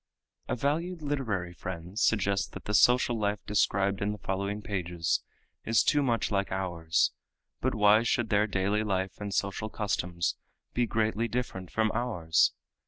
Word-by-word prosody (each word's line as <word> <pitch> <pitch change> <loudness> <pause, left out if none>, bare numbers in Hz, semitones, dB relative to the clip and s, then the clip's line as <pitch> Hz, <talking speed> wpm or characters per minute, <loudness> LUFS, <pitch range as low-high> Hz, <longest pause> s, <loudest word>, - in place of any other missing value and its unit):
A - - 0
valued 160 +6 -1
literary 110 -12 -2
friend 90 +3 -6
suggests 100 -3 +2
that - - -10
the 105 - -3
social 120 +1 +4
life 105 0 0
described 100 -1 +1
in 100 +1 0
the - - -7
following 100 +2 -3
pages 85 -4 -1 0.4
is 115 0 +3
too 145 0 +3
much 120 -5 0
like 100 -1 0
ours, 85 -3 +1 0.5
but 130 -1 0
why 105 +1 +6
should 120 -1 0
their 105 +1 +3
daily 100 +2 0
life 95 -1 -2
and 100 -1 -4
social 100 +3 -1
customs 90 -5 -1 0.4
be 120 -1 +1
greatly 110 +1 0
different 115 -7 -4
from 110 -1 +1
ours? 100 -10 +2
105 Hz, 155 wpm, -29 LUFS, 95-115 Hz, 0.5 s, why